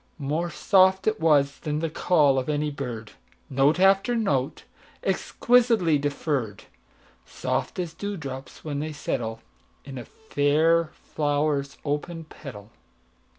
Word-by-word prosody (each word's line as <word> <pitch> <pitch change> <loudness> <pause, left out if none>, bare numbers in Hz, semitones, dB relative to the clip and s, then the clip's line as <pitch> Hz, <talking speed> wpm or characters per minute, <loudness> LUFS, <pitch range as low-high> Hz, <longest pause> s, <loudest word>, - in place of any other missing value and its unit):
More 155 +4 -2
soft 190 +2 +3
it 215 0 +1
was 145 -3 +3
than 150 +1 -2
call 150 -5 +3
of 130 - -4
any 150 0 0
bird, 120 -6 -6 0.4
Note 140 +5 +3
after 195 +5 +4
note, 145 - 0 0.4
exquisitely 230 -11 +2
deferr'd, 140 - -2 0.6
Soft - - -3
as 175 -3 -3
dew 205 +3 -4
drops 135 -2 -8
when 145 -2 -3
they 155 +1 -4
settleIn 115 -6 -3 0.6
a - - -7
fair 165 -3 +2
flower's 145 -2 -1
open 155 +3 -3
petal. 120 -9 -11
150 Hz, 115 wpm, -25 LUFS, 140-170 Hz, 0.6 s, after